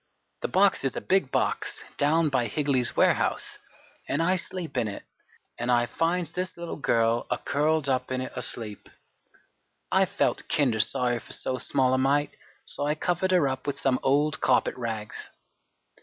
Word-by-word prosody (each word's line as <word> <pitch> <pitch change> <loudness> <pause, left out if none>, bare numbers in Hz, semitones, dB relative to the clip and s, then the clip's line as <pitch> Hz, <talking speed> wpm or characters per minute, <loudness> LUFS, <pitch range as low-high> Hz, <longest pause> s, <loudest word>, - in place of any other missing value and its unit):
The - - -1
box 195 +1 +3
is 135 - -1
a - - -1
big 190 -8 +1
box - - -1
down 155 +2 +3
by 130 -4 +1
Higley's 135 0 0
warehouse, - - +1 0.5
an' 145 - -1
I 175 +3 +3
sleep 185 -3 -4
in 120 -3 +1
it. 100 - -6 0.6
An' 120 - -2
I 120 -1 +4
finds 165 +4 -1
this 180 0 -4
little 170 -1 -5
girl 115 -4 +1
a - - 0
curled 155 0 0
up 130 -2 0
in 130 - -1
it 130 - -5
asleep. 110 -5 -5 1.0
I - - +4
felt - - -1
kinder 125 -7 +2
sorry 120 +2 +1
for - - -10
so 130 -1 -3
small 130 0 +1
a 130 - +2
mite, 145 +2 +1 0.3
so - - -3
I 150 +1 +1
covered 175 +3 0
her 180 -6 +4
up 130 0 -4
with 145 - -2
some 130 -2 +1
old 145 +3 +2
carpet 125 - +3
rags. 110 -4 -4
135 Hz, 170 wpm, -27 LUFS, 125-160 Hz, 1.0 s, I